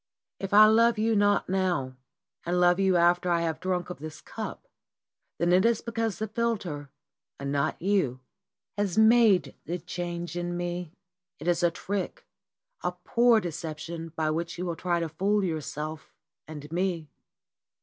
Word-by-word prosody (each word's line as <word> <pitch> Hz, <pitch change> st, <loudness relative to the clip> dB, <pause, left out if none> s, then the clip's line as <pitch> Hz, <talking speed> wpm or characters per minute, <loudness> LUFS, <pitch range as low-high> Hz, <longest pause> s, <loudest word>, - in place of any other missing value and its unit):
"If 195 Hz, -, -4 dB
I 210 Hz, +1 st, +9 dB
love 230 Hz, +1 st, +4 dB
you 220 Hz, +1 st, +2 dB
not 205 Hz, 0 st, +3 dB
now 180 Hz, -9 st, 0 dB, 0.5 s
and 175 Hz, +1 st, 0 dB
love 175 Hz, +1 st, +4 dB
you 190 Hz, -1 st, +3 dB
after 175 Hz, +1 st, +3 dB
I 170 Hz, -1 st, +2 dB
have 165 Hz, -2 st, -2 dB
drunk 180 Hz, -1 st, -2 dB
of 180 Hz, -, -8 dB
this 155 Hz, +1 st, -8 dB
cup, -, -, -7 dB, 0.7 s
then 175 Hz, +2 st, +2 dB
it 185 Hz, +1 st, +5 dB
is 230 Hz, -1 st, +2 dB
because 225 Hz, -2 st, -2 dB
the 220 Hz, -, -3 dB
philter 200 Hz, -11 st, -2 dB, 0.5 s
and 140 Hz, 0 st, -3 dB
not 140 Hz, +2 st, 0 dB
you 180 Hz, -10 st, +1 dB, 0.6 s
has 200 Hz, -2 st, -1 dB
made 220 Hz, -3 st, +5 dB
the 175 Hz, -, -2 dB
change 175 Hz, 0 st, -5 dB
in 175 Hz, 0 st, -3 dB
me. 175 Hz, -1 st, -4 dB, 0.5 s
It -, -, -8 dB
is 175 Hz, 0 st, +2 dB
a 175 Hz, -, +4 dB
trick, 205 Hz, -, -4 dB, 0.6 s
a -, -, -1 dB
poor 235 Hz, -1 st, +3 dB
deception 165 Hz, -1 st, -5 dB
by 155 Hz, -1 st, 0 dB
which 170 Hz, +2 st, -3 dB
you 180 Hz, -, -3 dB
will 170 Hz, -2 st, -2 dB
try 175 Hz, 0 st, 0 dB
to 165 Hz, -, -1 dB
fool 195 Hz, +6 st, 0 dB
yourself 155 Hz, -2 st, -4 dB, 0.3 s
and 150 Hz, -1 st, -9 dB
me." 175 Hz, -2 st, -1 dB
175 Hz, 160 wpm, -27 LUFS, 165-205 Hz, 0.7 s, I